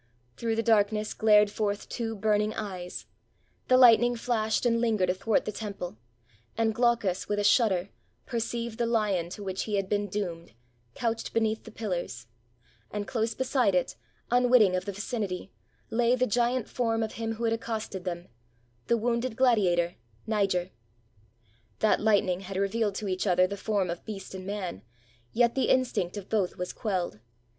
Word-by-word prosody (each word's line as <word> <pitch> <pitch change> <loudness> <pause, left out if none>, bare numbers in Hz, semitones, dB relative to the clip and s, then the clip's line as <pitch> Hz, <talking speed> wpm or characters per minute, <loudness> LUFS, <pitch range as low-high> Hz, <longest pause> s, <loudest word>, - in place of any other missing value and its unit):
Through 230 -1 -1
the 225 - 0
darkness 215 -1 +2
glared 210 -1 +5
forth 205 -1 -2
two 225 -2 -3
burning 210 +1 +1
eyes 185 -4 -6 0.3
— - - -41
the 255 - +5
lightning 240 -1 +7
flashed 225 -1 0
and 230 -1 +2
lingered 215 -6 +2
athwart 200 +4 0
the - - -2
temple 200 - -6 0.3
— 115 -1 -34
and 225 -1 +2
Glaucus, 230 -5 +1
with 205 - 0
a 205 - 0
shudder, 205 -3 +3 0.4
perceived 235 -1 -3
the 235 - +1
lion 205 -7 +1
to 205 +3 -7
which 190 -1 -3
he 210 - -1
had 195 -1 0
been 205 0 0
doomed 175 - -4 0.4
couched 230 -1 -2
beneath 220 -1 0
the 225 - -10
pillars; 175 - -4 0.6
and, 205 -1 -4
close 225 -2 -1
beside 250 -6 +1
it, 180 - 0 0.4
unwitting 245 -6 +5
of 185 0 -2
the 200 - -3
vicinity, 200 -2 -4 0.4
lay 240 +2 +3
the 255 0 +2
giant 240 +1 +1
form 225 -2 0
of 220 - -3
him 225 0 -3
who 225 +1 -6
had 225 -1 +2
accosted 220 -4 -4
them 175 -1 -5 0.3
— 120 0 -38
the 235 - +3
wounded 235 +1 -1
gladiator, 190 -9 +2 0.3
Niger. 195 -4 0 1.1
That 215 - +2
lightning 205 -4 +2
had 190 0 -6
revealed 200 +1 0
to 210 - -3
each 185 +2 -1
other 180 0 +4
the 200 +2 -4
form 200 -3 -1
of 170 - -6
beast 195 -4 -7
and 190 0 -7
man; 195 - -4 0.5
yet 235 0 +3
the 265 - 0
instinct 240 -8 +1
of 200 -1 -7
both 205 -5 0
was 180 0 -4
quelled. 185 - -2
210 Hz, 170 wpm, -28 LUFS, 185-230 Hz, 1.1 s, lightning